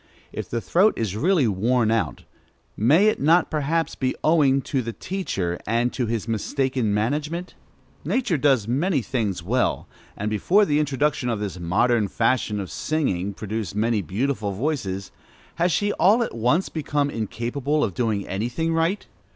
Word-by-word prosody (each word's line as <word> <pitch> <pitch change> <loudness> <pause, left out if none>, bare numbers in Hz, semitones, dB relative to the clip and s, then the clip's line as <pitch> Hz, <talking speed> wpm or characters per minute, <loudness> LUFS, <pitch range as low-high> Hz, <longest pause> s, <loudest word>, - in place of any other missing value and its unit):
If - - -5
the 115 - -2
throat 195 - +3
is 105 -4 -2
really 155 - +2
worn 110 +3 +1
out, 115 -1 -1 0.5
may 150 - +4
it 215 - +2
not 165 +4 +4
perhaps 160 +2 0
be 130 -1 -1
owing 140 -4 +3
to 135 - -1
the 115 -1 -5
teacher, 100 - -3
and 120 +2 +1
to 125 -3 -1
his 115 -1 -2
mistaken 125 +1 -1
management? 150 - -2 0.5
Nature 225 - 0
does 130 -7 +3
many 140 +3 +1
things 110 -9 -2
well, 120 +7 0 0.3
and 105 +1 -2
before 190 - +3
the 150 -4 +1
introduction 145 -3 0
of 115 -3 -1
this 100 -3 -4
modern 105 +6 +2
fashion 115 0 0
of 95 - -5
singing 100 - -1
produced 105 -2 -4
many 110 0 +1
beautiful 105 - -2
voices: 100 -6 -3 0.5
has 175 +1 +2
she 205 +4 +1
all 215 +6 +4
at - - -5
once 125 +11 +1
become 145 -2 -1
incapable 120 +6 -2
of 100 - -1
doing 110 -2 -1
any 105 +5 -2
thing 160 +6 -1
right? 165 +5 0
125 Hz, 160 wpm, -23 LUFS, 105-155 Hz, 0.5 s, may